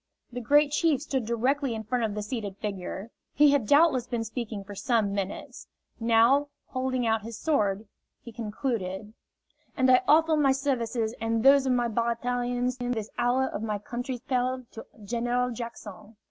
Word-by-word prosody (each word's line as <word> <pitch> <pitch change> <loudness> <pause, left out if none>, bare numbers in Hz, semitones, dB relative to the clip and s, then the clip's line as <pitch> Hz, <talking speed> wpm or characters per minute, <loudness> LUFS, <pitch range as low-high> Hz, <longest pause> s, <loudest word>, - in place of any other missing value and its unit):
The 245 +1 -5
Great 290 +5 +4
Chief 305 -2 +2
stood 265 -6 -3
directly 255 +2 0
in 220 - -5
front 245 +2 -1
of 210 -2 -3
the 210 - -3
seated 210 -4 -5
figure. 200 +1 -5 0.2
He 295 0 +6
had 275 -7 +1
doubtless 285 -4 +4
been 235 -2 -2
speaking 225 -3 -5
for 205 +1 -10
some 215 -1 0
minutes. 200 -1 -5 0.3
Now, 235 +5 +4 0.2
holding 255 -2 -1
out 225 -1 +1
his 230 +1 -8
sword, 210 -9 0 0.3
he 235 - -11
concluded: 210 -3 -4 0.6
"And 260 0 +4
I 255 - +6
offer 320 +1 +5
my 280 -3 +3
services 240 -5 -1
and 225 0 0
those 275 0 +6
of 255 - +3
my 240 -1 +1
Baratarians 245 +2 -1
in 245 0 -1
this 220 -3 -5
hour 250 +2 +2
of - - -5
my 215 -2 -2
country's 245 +4 -5
peril 255 0 -1
to 225 - -10 0.2
General 245 +3 0
Jackson." 220 -2 -8
240 Hz, 170 wpm, -27 LUFS, 220-260 Hz, 0.6 s, He